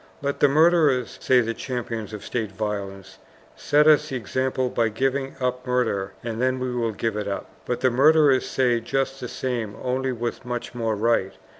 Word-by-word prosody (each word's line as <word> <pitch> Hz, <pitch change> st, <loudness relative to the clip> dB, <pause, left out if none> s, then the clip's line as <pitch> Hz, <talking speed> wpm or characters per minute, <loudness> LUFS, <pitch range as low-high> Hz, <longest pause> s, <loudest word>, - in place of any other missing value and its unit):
"Let 140 Hz, 0 st, -2 dB
the 145 Hz, -, +6 dB
murderers," 150 Hz, -4 st, +3 dB
say 130 Hz, -1 st, +4 dB
the 115 Hz, 0 st, -2 dB
champions 115 Hz, -3 st, -5 dB
of 105 Hz, -2 st, -8 dB
state 110 Hz, -4 st, -3 dB
violence, 100 Hz, -2 st, -5 dB, 0.4 s
"set 150 Hz, +1 st, +3 dB
us 155 Hz, 0 st, +5 dB
the 135 Hz, -, -4 dB
example 130 Hz, +3 st, -1 dB
by 115 Hz, -1 st, +1 dB
giving 135 Hz, +4 st, -1 dB
up 125 Hz, 0 st, -2 dB
murder 100 Hz, -6 st, 0 dB
and 115 Hz, 0 st, -4 dB
then 130 Hz, 0 st, +1 dB
we 125 Hz, -1 st, -2 dB
will 115 Hz, -2 st, -1 dB
give 110 Hz, +1 st, -2 dB
it 105 Hz, -1 st, -3 dB
up." 100 Hz, -, -4 dB, 0.2 s
But 125 Hz, -, -2 dB
the 130 Hz, -, +3 dB
murderers 145 Hz, +1 st, +4 dB
say 125 Hz, -3 st, +2 dB
just 135 Hz, +3 st, -2 dB
the 125 Hz, -, -5 dB
same, 120 Hz, -5 st, -3 dB
only 130 Hz, +1 st, -1 dB
with 120 Hz, 0 st, -4 dB
much 120 Hz, -1 st, -5 dB
more 115 Hz, -3 st, -1 dB
right. 105 Hz, -3 st, +1 dB
125 Hz, 185 wpm, -24 LUFS, 110-130 Hz, 0.4 s, the